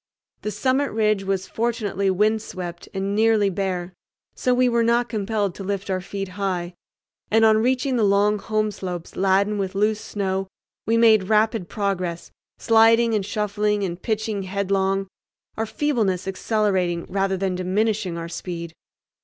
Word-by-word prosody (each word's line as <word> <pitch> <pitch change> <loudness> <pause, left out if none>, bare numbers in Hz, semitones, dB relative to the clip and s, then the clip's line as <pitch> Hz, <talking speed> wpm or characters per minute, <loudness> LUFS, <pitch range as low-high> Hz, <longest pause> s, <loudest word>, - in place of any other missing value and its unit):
The 210 - -3
summit 260 +7 0
ridge 215 -2 +1
was 190 -1 -1
fortunately 215 -3 -1
wind 215 +3 +2
swept 175 -4 -7
and 195 +1 -2
nearly 215 -2 +3
bare, 185 -1 -3 0.4
so 250 - 0
we 250 0 +3
were 235 -1 +2
not 235 +1 +2
compelled 210 -3 -1
to 195 - -8
lift 195 0 -3
our 185 0 -1
feet 195 +1 -5
high, 185 -2 -3 0.6
and 225 +1 +4
on 220 0 +5
reaching 255 +2 +1
the 225 - +2
long 205 +1 +3
home 215 0 -1
slopes 180 -4 -6
laden 195 +2 +2
with 195 0 -3
loose 210 +1 +1
snow 195 -1 -2 0.4
we 225 +1 +3
made 220 -4 +5
rapid 215 -3 +2
progress, 185 -4 -3 0.3
sliding 230 0 +4
and 205 -3 0
shuffling 210 0 0
and 175 -1 -4
pitching 220 -2 -2
headlong, 195 0 0 0.5
our 225 0 -2
feebleness 215 -10 0
accelerating 190 -4 0
rather 195 -1 0
than 190 0 -1
diminishing 190 0 -1
our 165 0 -5
speed. 170 -1 -6
200 Hz, 155 wpm, -23 LUFS, 190-220 Hz, 0.6 s, on